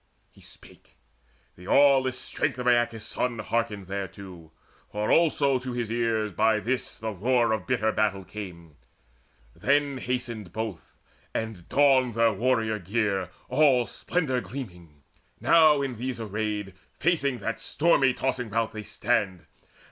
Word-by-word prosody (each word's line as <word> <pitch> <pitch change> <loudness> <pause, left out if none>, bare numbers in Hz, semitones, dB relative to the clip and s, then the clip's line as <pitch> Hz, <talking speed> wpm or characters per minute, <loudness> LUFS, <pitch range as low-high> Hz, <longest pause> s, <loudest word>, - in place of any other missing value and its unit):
He - - -20
spake: - - -16 0.6
the 90 - -14
aweless 135 -2 +4
strength - - -2
of 125 - -4
Aeacus' 120 -2 +2
son 125 -2 -2
Hearkened 110 -2 -2
thereto, 95 -3 -7 0.4
for 105 +1 -1
also 145 -5 +3
to 125 0 -5
his 120 -2 -3
ears 115 -2 0
By 110 +4 +2
this 125 +4 -3
the 110 0 -4
roar 120 +4 +1
of 110 -5 -2
bitter 110 +1 +1
battle 105 -3 0
came. 85 -7 -9 0.8
Then 140 -1 +1
hasted 120 -6 -4
both, 110 -4 -6 0.4
and 110 -6 -4
donned 130 -4 +4
their 115 -1 +3
warrior 115 -3 0
gear 100 -1 -1 0.2
All 130 -3 +4
splendour 135 -6 -2
gleaming: 90 - -9 0.4
now, 155 -4 +5
in 130 -4 -4
these 125 +1 -4
arrayed 105 -2 -3 0.3
Facing 140 -5 +1
that 115 -1 -4
stormy 145 -4 +3
tossing 125 -3 -2
rout 115 +1 0
they 110 - -6
stand. 105 -5 -1
115 Hz, 135 wpm, -26 LUFS, 105-130 Hz, 0.8 s, now